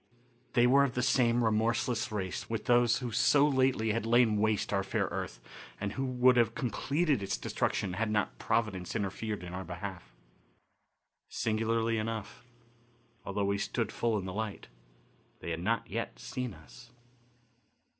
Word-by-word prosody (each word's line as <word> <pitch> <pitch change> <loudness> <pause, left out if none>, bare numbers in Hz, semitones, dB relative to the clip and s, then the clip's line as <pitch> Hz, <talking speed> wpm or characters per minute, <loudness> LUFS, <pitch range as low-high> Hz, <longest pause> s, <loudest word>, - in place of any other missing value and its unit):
They 120 - +5
were 135 +3 +6
of 135 -3 -1
the 125 - 0
same 120 -2 +3
remorseless 115 +1 +1
race 95 -4 -4
with 115 -2 -3
those 120 -2 +4
who 120 - -3
so 140 +5 +4
lately 130 -5 +2
had 115 +1 -1
lain 115 -1 +4
waste 105 0 +1
our 100 - +2
fair 95 - 0
earth - - -4 0.4
and 100 0 -3
who 135 - -2
would 125 0 +4
have 115 -2 +3
completed 140 +2 0
its 100 - -2
destruction 90 - -1
had 110 +3 -1
not 100 - -1
Providence 100 -6 -1
interfered 105 0 -3
in 90 0 -7
our 95 +1 -4
behalf. 90 -4 -7 1.2
Singularly 115 0 0
enough, 110 +1 -5 0.8
although 100 0 -1
we 100 0 0
stood 115 +1 -2
full 115 -2 0
in 95 - -4
the 95 - -5
light, 105 - -4 0.7
they 85 - -5
had 80 0 -3
not 115 +4 0
yet - - -4
seen 125 - -5
us. 120 0 -15
110 Hz, 155 wpm, -31 LUFS, 100-120 Hz, 1.2 s, were